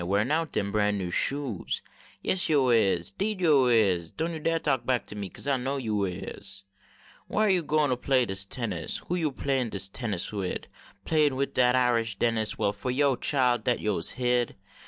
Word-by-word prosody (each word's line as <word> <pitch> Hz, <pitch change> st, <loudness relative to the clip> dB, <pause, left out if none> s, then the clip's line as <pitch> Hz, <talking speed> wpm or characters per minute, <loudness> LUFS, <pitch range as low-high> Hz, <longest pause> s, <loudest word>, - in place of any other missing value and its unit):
Warin 100 Hz, +8 st, 0 dB
out 160 Hz, 0 st, 0 dB
deni 100 Hz, -1 st, -1 dB
bran 105 Hz, 0 st, +1 dB
new 90 Hz, -3 st, -3 dB
shoes, 135 Hz, -1 st, 0 dB, 0.4 s
Yase 185 Hz, -2 st, +1 dB
yo 140 Hz, -5 st, +3 dB
is, 100 Hz, -7 st, +2 dB
deed 205 Hz, -, -2 dB
yo 150 Hz, -7 st, +4 dB
is, 95 Hz, -8 st, +3 dB
Doan 165 Hz, +2 st, -3 dB
yo 160 Hz, -, -5 dB
dar 165 Hz, +2 st, +1 dB
talk 140 Hz, -5 st, 0 dB
back 125 Hz, -2 st, 0 dB
to -, -, -8 dB
me, 100 Hz, -2 st, -5 dB
Kase -, -, -7 dB
I 140 Hz, -1 st, +2 dB
know 135 Hz, +3 st, -2 dB
yo 105 Hz, -6 st, -1 dB
is. 95 Hz, +1 st, -6 dB, 0.6 s
Whar 215 Hz, +1 st, +1 dB
yo 185 Hz, -3 st, +3 dB
gwine 150 Hz, -1 st, +1 dB
to 125 Hz, -, +2 dB
play 130 Hz, 0 st, +2 dB
dis 95 Hz, -2 st, -4 dB
tennis? 115 Hz, +2 st, -3 dB
Who 175 Hz, -, +1 dB
yo 165 Hz, -4 st, 0 dB
playin 135 Hz, -3 st, -1 dB
tennis 100 Hz, 0 st, -3 dB
wid? 95 Hz, -3 st, -3 dB, 0.4 s
Playin 150 Hz, -4 st, +2 dB
wid 140 Hz, +1 st, -2 dB
dat 125 Hz, 0 st, +4 dB
Irish 115 Hz, -4 st, +2 dB
Dennis, 110 Hz, -2 st, 0 dB
Well 100 Hz, -, +1 dB
fo 105 Hz, +5 st, -5 dB
yo, 135 Hz, +1 st, +2 dB
chile, 125 Hz, -2 st, +2 dB
dat 125 Hz, 0 st, +1 dB
yo 105 Hz, -4 st, -1 dB
s 80 Hz, -, +1 dB
hid. 125 Hz, -1 st, +1 dB
125 Hz, 200 wpm, -27 LUFS, 105-140 Hz, 0.6 s, yo